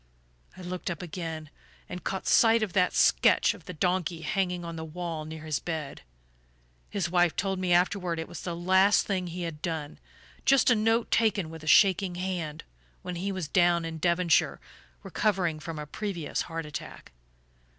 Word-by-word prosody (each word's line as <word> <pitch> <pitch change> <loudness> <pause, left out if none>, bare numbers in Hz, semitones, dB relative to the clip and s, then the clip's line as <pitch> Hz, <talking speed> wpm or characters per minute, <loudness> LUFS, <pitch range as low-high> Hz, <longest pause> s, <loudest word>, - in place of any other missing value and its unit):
"I - - -9
looked 180 0 -4
up 170 0 -5
again, 160 -3 -6 0.4
and 180 - -7
caught 190 - -3
sight 225 -1 +5
of 200 -5 -3
that 180 -2 +2
sketch - - +4
of - - -15
the 180 - -7
donkey 175 0 -1
hanging 180 -3 -1
on 170 0 -6
the 160 - -5
wall 165 -1 -5
near 155 0 -8
his 155 -2 -1
bed. 155 -5 -5 0.9
His 190 -4 -1
wife 175 -2 +3
told 190 -1 -1
me 185 -1 -1
afterward 180 -1 +2
it 160 - -4
was 175 - -8
the 175 -2 -4
last 190 +4 +4
thing 185 -3 -2
he 175 +1 -5
had 160 -3 -5
done 160 -4 -4 0.4
just 270 -2 +5
a - - +5
note 225 +2 +1
taken 205 -7 +2
with 160 -1 -10
a - - -9
shaking 190 +1 +4
hand, 175 -4 -4 0.4
when 180 -1 -5
he 195 +3 -2
was 185 -5 -4
down 175 0 +3
in 160 -1 -5
Devonshire 170 0 +2 0.4
recovering 180 -7 0
from 165 0 -6
a 150 - -5
previous 175 0 -3
heart 165 -1 -4
attack. 150 - -8
175 Hz, 180 wpm, -28 LUFS, 160-190 Hz, 0.9 s, sight